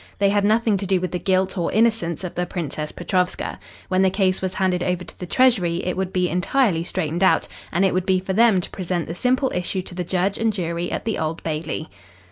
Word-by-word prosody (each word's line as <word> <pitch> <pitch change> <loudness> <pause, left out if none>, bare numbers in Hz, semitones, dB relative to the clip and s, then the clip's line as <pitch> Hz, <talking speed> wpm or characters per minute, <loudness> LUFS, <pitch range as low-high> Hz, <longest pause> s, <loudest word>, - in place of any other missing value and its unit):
They 200 -1 +3
had 205 0 +2
nothing 220 0 +3
to 195 0 -4
do 190 -1 +2
with 180 -2 -3
the 180 - -2
guilt 190 0 +1
or 170 - 0
innocence 215 -7 +1
of 180 - -4
the 180 0 -2
Princess 150 -3 -4
Petrovska. 180 +1 -1 0.3
When 185 0 +2
the 190 - +5
case 190 -1 +1
was 185 0 -3
handed 185 -3 +1
over 180 0 -1
to - - -14
the 180 - -5
Treasury 185 -8 +2
it 180 - -1
would 190 -1 -2
be 180 -1 +1
entirely 180 0 +1
straightened 170 0 -2
out, 190 - +4 0.2
and 190 +3 +2
it 190 - +2
would 185 0 -1
be 190 -1 +3
for 190 +1 -3
them 220 -3 +5
to - - -6
present 180 -2 -2
the 165 - -5
simple 255 +7 +1
issue 180 +1 -1
to 180 - -9
the 180 0 -3
judge 185 +3 0
and 225 0 +2
jury 175 -3 -3
at - - -3
the 225 - -1
Old 160 0 -3
Bailey. 155 0 -3
185 Hz, 240 wpm, -22 LUFS, 175-195 Hz, 0.3 s, the